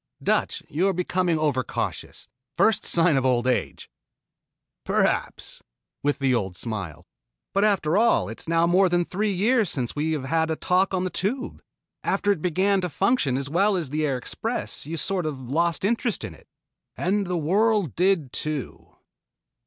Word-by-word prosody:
"Dutch, - - 0
you 170 +7 0
are 195 - +2
becoming 180 -1 0
over 145 -4 +1
cautious. - - -5 0.3
First 220 -1 +3
sign 165 -3 +4
of 135 - +1
old 125 -2 +2
age." 130 -1 -1 1.0
"Perhaps," - - -1 0.4
with 145 0 0
the 135 -2 +1
old 95 -6 -1
smile. 95 -8 -5 0.5
"But 200 +2 +3
after 195 -4 +2
all 225 - +3
it 110 - -8
is - - -5
now 165 0 +3
more 185 +2 +4
than 175 0 +1
three 205 +4 -1
years 215 +2 +2
since 125 -4 -3
we 155 +2 0
have 150 -4 -3
had 160 +4 0
a 160 - 0
talk 185 +3 +1
on 185 - 0
the 185 - -2
Tube. 240 +8 -3 0.4
After 205 - +1
it 185 -6 -1
began 190 +3 +1
to 180 - -2
function 180 - +1
as 140 0 -2
well 195 +7 +2
as 165 -7 -3
the 155 +1 -1
Air 140 -4 0
Express 225 - -3
you 165 +1 -4
sort 180 0 -1
of 150 -3 -4
lost 165 +8 0
interest 235 +1 0
in - - -6
it." - - -19 0.5
"And 195 +2 0
the 180 0 -1
world 200 - +2
did 175 -7 +1
too." 150 -3 -5
170 Hz, 175 wpm, -24 LUFS, 145-195 Hz, 1.0 s, sign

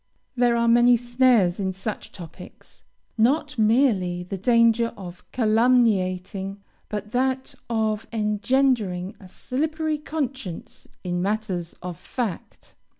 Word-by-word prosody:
There 240 -1 +3
are 235 0 +2
many 240 +1 +6
snares 240 -6 +3
in 190 -1 -1
such 195 +3 -6
topics; 175 0 -12 0.4
not 285 +3 +2
merely 215 -6 +2
the 185 +2 -5
danger 230 +2 +3
of 180 -2 -9
calumniating, 205 -5 +1 0.3
but 210 0 -5
that 260 +1 -1 0.2
of 220 -2 -1
engendering 210 -3 0
a 190 - -13
slippery 310 - -2
conscience 270 - -5 0.2
in 175 -1 -2
matters 195 -4 -2
of 180 -2 -6
fact. 235 -9 -6
220 Hz, 110 wpm, -24 LUFS, 190-250 Hz, 0.4 s, many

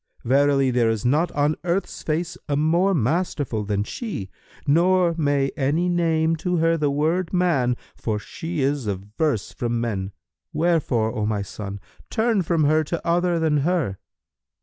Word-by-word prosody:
Verily 135 +1 +3
there 120 -2 +2
is 115 +1 -2
not 150 +8 +2
on 145 +2 +1
earth's 180 +2 -2
face 165 +3 -2
a 145 - +1
more 170 +6 +2
masterful 145 -4 0
than 100 0 -1
she, 105 - -5 0.3
nor 175 +3 +3
may 145 -3 +1
any 150 +6 +1
name 165 -2 +2
to 180 +1 -1
her 165 +1 +3
the 150 -3 +1
word 160 +5 0
'man', 150 -10 +2 0.2
for 110 -2 -2
she 160 +9 -5
is 135 -3 0
averse 105 - -2
from 120 -1 -2
men. 100 -5 -2 0.4
Wherefore, 145 -10 +1
O 110 -3 -1
my 105 -2 -1
son, 100 0 -7 0.3
turn 225 -3 +1
from 165 -2 +1
her 155 +2 +3
to 170 +3 -4
other 175 0 +2
than 160 -2 +2
her." 145 - 0
150 Hz, 155 wpm, -23 LUFS, 120-170 Hz, 0.4 s, Verily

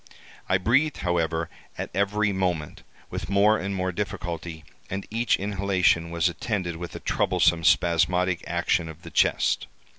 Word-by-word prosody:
I 90 - +4
breathed, 135 +10 +2
however, 85 -2 0 0.3
at - - -5
every 100 +1 +1
moment, 90 -5 -2 0.3
with 80 - -5
more 105 +2 +4
and 100 +1 -3
more 95 0 -1
difficulty, 85 -5 -5 0.2
and 95 +1 -4
each 115 +2 +2
inhalation 95 -4 +1
was 85 -1 +1
attended 90 -1 -2
with 85 0 -7
a - - -5
troublesome 85 0 +2
spasmodic 90 +2 +2
action 80 - 0
of 80 +1 -11
the - - -10
chest. - - +2
90 Hz, 145 wpm, -25 LUFS, 85-100 Hz, 0.3 s, I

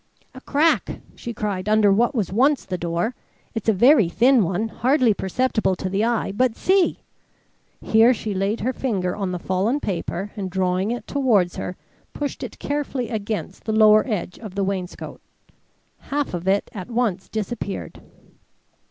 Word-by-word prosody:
"A 260 - -11
crack!" 290 - +1 0.2
she 235 - -6
cried, 205 -3 -3
"under 215 -2 +5
what 240 +7 +2
was 200 -5 -1
once 270 +5 +3
the 185 - -3
door. 175 +6 -2 0.4
It's 225 -1 -1
a - - +7
very 220 - +5
thin 245 +4 +4
one, 190 +5 -1
hardly 255 -1 +2
perceptible 200 0 0
to 185 - -4
the 195 +3 0
eye. 230 -3 0
But 235 +3 +1
see!" 375 -1 +2 0.8
Here 225 +2 +5
she 220 -4 -2
laid 195 +4 -1
her 255 +5 0
finger 190 -10 -1
on 195 -3 -2
the 180 - -2
fallen 190 +10 0
paper 195 -2 -3
and 195 -3 -4
drawing 185 +1 0
it 240 +1 -3
towards 225 -11 +1
her, 180 - -4 0.4
pushed 290 -1 -4
it - - -7
carefully 280 -4 -3
against 215 -2 -4
the 220 - -1
lower 215 0 +6
edge 190 -6 -3
of 210 -5 -9
the 200 - 0
wainscot. 190 -2 -4 0.8
Half 290 -5 -3
of 175 +1 -4
it 195 +1 +1
at 195 +1 -7
once 225 -6 -1
disappeared. 215 -2 -5
215 Hz, 165 wpm, -22 LUFS, 190-245 Hz, 0.8 s, a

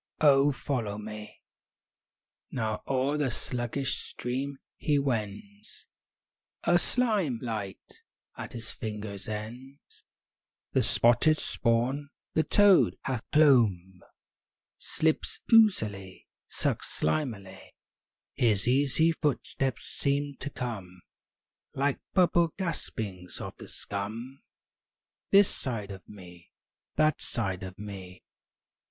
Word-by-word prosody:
oh, 145 -1 +6
follow 120 -7 -3
me!" 105 0 -7
III - - -18 1.2
Now 110 -3 -2
o'er 135 +2 +1
the 145 -3 +1
sluggish 125 +2 0
stream 135 +3 -2 0.2
he 150 -2 +1
wends, 140 - -4 0.8
A - - +4
slim 210 - +1
light 105 -5 -6 0.3
at - - -7
his 115 -1 -4
fingers' 105 -3 -4
ends; 120 +6 -8 0.7
The - - +3
spotted 120 +7 +4
spawn, 125 +5 0 0.2
the 160 - +3
toad 190 - +5
hath 125 -4 -2
clomb, 110 - +4 0.8
Slips 160 0 0
oozily, 105 - +3 0.2
sucks - - -2
slimily; 100 - -2 0.7
His 110 -4 +2
easy 140 +5 +3
footsteps 135 -4 -1
seem 140 0 -1
to 145 - -5
come 100 -9 -6 0.7
Like 140 0 0
bubble 175 -3 +3
gaspings 110 - -4
of - - -6
the - - -10
scum 110 +7 -6 0.9
This 200 0 +5
side 110 -7 -4
of 95 -1 -8
me; 90 -4 -13 0.5
that 155 -1 +2
side 95 -6 -1
of 95 -1 -8
me. 95 -3 -9
125 Hz, 100 wpm, -29 LUFS, 105-145 Hz, 1.2 s, oh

